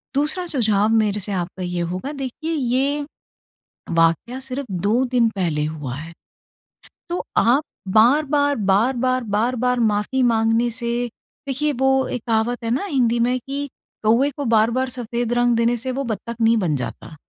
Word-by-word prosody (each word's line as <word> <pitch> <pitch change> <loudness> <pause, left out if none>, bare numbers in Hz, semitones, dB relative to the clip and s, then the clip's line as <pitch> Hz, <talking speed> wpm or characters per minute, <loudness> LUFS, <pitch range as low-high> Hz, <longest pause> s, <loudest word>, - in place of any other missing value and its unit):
दूसरा 300 +6 +1
सुझाव 220 -8 +2
मेरे 215 -2 +2
से 205 +1 -5
आपका 185 0 -3
ये 180 -1 -2
होगा 260 +11 -4
देखिए 280 +3 -5
ये 280 +1 0 0.9
वाक़या 165 +10 +2
सिर्फ़ 265 +1 -5
2 205 +7 +1
दिन 245 -2 +2
पहले 160 -5 0
हुआ 150 -5 -4
है। 160 +3 -8 1.0
तो 350 - -2
आप 255 +6 +4 0.2
बार-बार, 285 +7 +3
बार-बार, 240 +5 +1
बार-बार 240 +4 0
माफ़ी 220 +3 +1
माँगने 225 0 +2
से 235 +1 -2 0.4
देखिए 285 +3 0
वो 265 +1 +2
एक 250 - -4
कहावत 230 +2 0
है 230 - -2
ना 265 +11 0
हिंदी 245 - +1
में 245 +2 +2
कि 280 +3 -5 0.4
"कौवे 230 +6 +4
को 285 - -3
बार-बार 230 +3 +2
सफेद 240 -1 -3
रंग 240 0 +3
देने 235 +1 +2
से 255 +3 -3
वो 270 +2 -2
बत्तख 235 -1 -4
नहीं 230 +1 +4
बन 175 -8 0
जाता।" 135 +4 -6
235 Hz, 155 wpm, -21 LUFS, 215-265 Hz, 1.0 s, आप